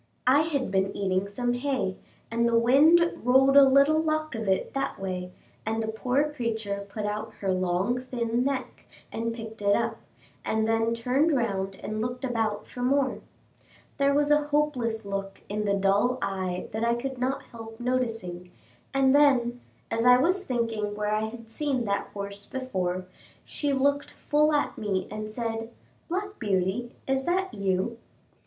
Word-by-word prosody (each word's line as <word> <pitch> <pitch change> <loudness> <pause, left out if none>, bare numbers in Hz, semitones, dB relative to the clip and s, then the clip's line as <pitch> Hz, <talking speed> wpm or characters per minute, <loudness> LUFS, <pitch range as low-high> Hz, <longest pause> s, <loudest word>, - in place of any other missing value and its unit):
I 265 +4 +5
had 285 -8 -1
been 195 0 0
eating 190 0 0
some 245 +4 -1
hay, 245 -7 -1 0.4
and 235 +1 +2
the 230 - +3
wind 310 +9 +5
rolled 265 +3 +5
a 280 - +10
little 280 +4 +5
lock 310 -1 -1
of 225 -4 -3
it 190 - 0
that 275 0 -2
way, 180 -1 -4 0.3
and 220 +1 -1
the 220 - -3
poor 255 +7 0
creature 220 -6 -3
put 210 +1 -4
out 210 +1 -4
her 195 -2 0
long 185 +6 0
thin 240 -1 -1
neck 270 -1 -3 0.2
and 230 +1 -2
picked 225 -2 -8
it 200 0 +4
up, 230 -1 -1 0.5
and 220 0 0
then 225 +1 +1
turned 270 +6 +2
round 195 -5 -1
and 215 0 -3
looked 245 +3 -3
about 220 -4 -1
for 245 - -8
more. 265 +2 +1 0.8
There 280 0 +3
was 290 0 +2
a 295 0 +3
hopeless 255 -7 0
look 195 -1 -5
in 210 +1 -2
the 200 -1 +2
dull 200 +6 +2
eye 185 -2 -2
that 220 +2 -2
I 235 0 +2
could 260 +1 -4
not 260 +2 -1
help 225 -1 -10
noticing, 225 -8 -2 0.5
and 270 -1 +4
then, 250 -4 +4 0.3
as 230 - 0
I 250 0 +7
was 365 +8 +2
thinking 225 - -1
where 210 0 -1
I 215 +1 +1
had 225 0 -9
seen 270 -2 -1
that 200 -1 -1
horse 200 0 -7
before, 185 -9 -2 0.4
she 290 -1 -2
looked 280 +1 +1
full 300 +1 +1
at 295 -1 0
me 195 -3 -1
and 215 0 -5
said, 225 0 -3 0.4
"Black 400 +4 -3
Beauty, 205 +3 -1
is 265 0 0
that 375 +2 0
you?" 200 +4 -1
230 Hz, 170 wpm, -27 LUFS, 205-270 Hz, 0.8 s, a